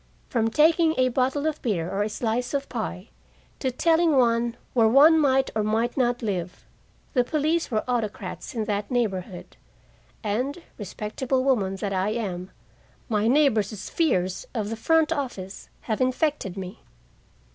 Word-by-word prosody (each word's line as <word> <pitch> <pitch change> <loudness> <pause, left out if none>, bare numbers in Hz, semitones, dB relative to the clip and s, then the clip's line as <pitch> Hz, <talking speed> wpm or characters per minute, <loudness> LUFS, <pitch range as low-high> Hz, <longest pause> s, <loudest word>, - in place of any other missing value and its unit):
From 225 -2 +1
taking 320 +4 +4
a 255 0 +3
bottle 265 +4 0
of 310 -1 -1
beer 185 - -1
or 195 +2 -2
a 210 - 0
slice 240 +4 -2
of 275 0 -2
pie, 215 -4 -5 0.5
to 265 - 0
telling 325 +3 +3
one 235 -1 +2 0.2
where 230 -3 +4
one 295 +7 +7
might 270 -2 +2
or 215 - +1
might 225 +3 0
not 245 -2 0
live, 180 -4 -3 0.5
the 250 - +3
police 310 +5 0
were 215 0 -1
autocrats 215 -4 -3
in 220 -2 -1
that 205 0 -2
neighborhood. 195 -7 -3 0.7
And, 255 +10 -2 0.2
respectable 220 +6 -2
woman 210 -8 +1
that 195 +1 -3
I 190 +2 0
am, 190 -5 -4 0.6
my 215 -1 +1
neighbors' 225 -7 +2
fears 185 - 0
of 215 -2 -2
the - - -2
front 320 +7 +2
office 245 - -4
have 220 +1 -2
infected 255 - 0
me. 185 -1 -7
235 Hz, 150 wpm, -25 LUFS, 205-275 Hz, 0.7 s, one